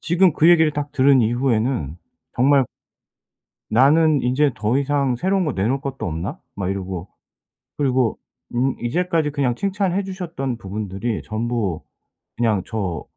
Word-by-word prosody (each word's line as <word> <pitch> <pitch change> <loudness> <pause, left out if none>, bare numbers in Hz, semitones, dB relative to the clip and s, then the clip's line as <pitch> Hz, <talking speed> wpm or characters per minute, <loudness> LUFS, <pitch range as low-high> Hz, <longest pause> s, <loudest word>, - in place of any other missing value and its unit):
지금 175 +1 +3
그 160 - +4
얘기를 160 -3 +5
딱 145 0 -3
들은 135 -1 +4
이후에는 115 - 0 0.4
정말 135 +2 +4 1.1
나는 145 +5 +4
인제 130 +3 +2
더 115 +5 0
이상 140 -3 0
새로운 190 +6 +1
거 150 - -1
내놓을 120 +8 0
것도 135 -6 -5
없나? 90 - -4 0.2
막 95 -2 -3
이러고. 95 -2 -5 0.7
그리고 130 -5 +1 0.4
음 130 +2 +1
이제까지 160 +3 0
그냥 135 -5 0
칭찬해 195 +1 -1
주셨던 170 -10 -4
부분들이 100 +2 -4
전부 110 -5 -2 0.6
그냥 110 -5 +1
저 95 -8 -3
130 Hz, 285 characters per minute, -21 LUFS, 110-150 Hz, 1.1 s, 얘기를